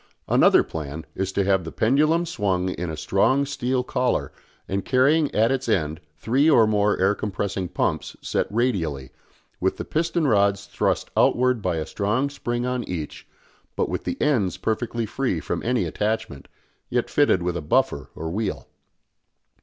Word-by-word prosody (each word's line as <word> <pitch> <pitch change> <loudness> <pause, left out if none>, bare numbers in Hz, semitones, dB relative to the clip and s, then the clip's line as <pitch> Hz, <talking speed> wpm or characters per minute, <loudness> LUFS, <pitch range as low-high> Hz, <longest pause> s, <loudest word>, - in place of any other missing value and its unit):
Another - - +5
plan 75 0 -6
is 95 0 -2
to 100 - +1
have 95 -1 +2
the 80 - -7
pendulum 155 +8 +2
swung 95 - -1
in 90 -2 -4
a 80 - -5
strong 115 - +2
steel 130 -2 -1
collar 125 - -1 0.4
and 95 0 -2
carrying 140 +4 +3
at 110 +3 +3
its 130 -2 -1
end 80 -7 0 0.2
three 135 - +2
or 120 -7 +6
more 105 -1 +2
air 95 +2 +3
compressing 100 -2 -3
pumps - - -2
set - - -1
radially, 90 - -1 0.5
with - - 0
the - - -5
piston 165 +1 0
rods 100 -3 +2
thrust - - -1
outwards 125 -1 +3
by 90 -3 -1
a 80 -1 -2
strong 115 +8 -1
spring 120 -3 -3
on 125 -1 -1
each, 80 -4 -5 0.5
but - - 0
with - - -3
the - - -4
ends 120 -11 +1
perfectly 115 +1 -2
free 115 -5 -1
from - - -3
any 125 +1 0
attachment, 105 -10 -3 0.4
yet 120 -1 0
fitted 145 -11 +2
with 90 0 -1
a 85 - -2
buffer 70 -1 0
or 80 0 -5
wheel. 105 +2 -3
105 Hz, 165 wpm, -24 LUFS, 90-125 Hz, 0.5 s, or